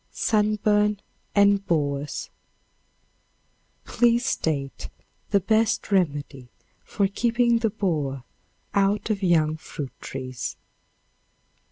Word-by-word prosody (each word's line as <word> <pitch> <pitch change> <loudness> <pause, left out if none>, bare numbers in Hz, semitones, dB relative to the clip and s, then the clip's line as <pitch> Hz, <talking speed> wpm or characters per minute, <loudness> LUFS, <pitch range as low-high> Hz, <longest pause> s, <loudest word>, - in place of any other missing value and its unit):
Sunburn 210 -1 +2 0.4
and 200 -1 +4
Borers. 145 -3 -1 1.5
Please 240 +1 +2
state 140 -4 -2 0.4
the 200 - +4
best 220 +2 +1
remedy 145 -8 0 0.4
for 200 -2 0
keeping 235 +3 +2
the 225 -1 +1
borer 155 - -2 0.5
out 200 +2 +1
of 205 -2 -2
young 160 -4 +2
fruit 145 -3 -7
trees. 130 -2 -5
195 Hz, 85 wpm, -25 LUFS, 145-210 Hz, 1.5 s, and